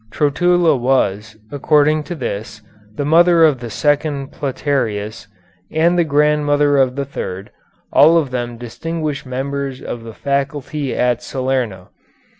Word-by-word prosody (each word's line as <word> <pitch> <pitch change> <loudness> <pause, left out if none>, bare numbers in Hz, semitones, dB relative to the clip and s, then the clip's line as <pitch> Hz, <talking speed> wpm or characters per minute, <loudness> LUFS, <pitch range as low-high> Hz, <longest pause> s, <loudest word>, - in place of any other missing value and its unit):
Trotula 170 +2 +2
was, 110 -4 0
according 150 +1 +2
to 175 - -5
this, 110 -5 -5 0.3
the 145 - -2
mother 170 +2 +5
of 145 -5 +2
the 120 -1 -7
second 145 +2 -1
Platearius, 125 -7 -3 0.4
and 165 +3 +2
the 175 - +3
grandmother 145 -1 +2
of 130 -1 +2
the 140 0 -2
third, 95 -7 -6 0.4
all 160 +3 +6
of 145 -6 0
them 120 -1 -4
distinguished 140 +5 -5
members 135 +1 -4
of 120 - -6
the 115 -1 -10
faculty 140 0 -2
at 125 -1 +1
Salerno. 130 -8 -3
140 Hz, 130 wpm, -18 LUFS, 120-150 Hz, 0.4 s, all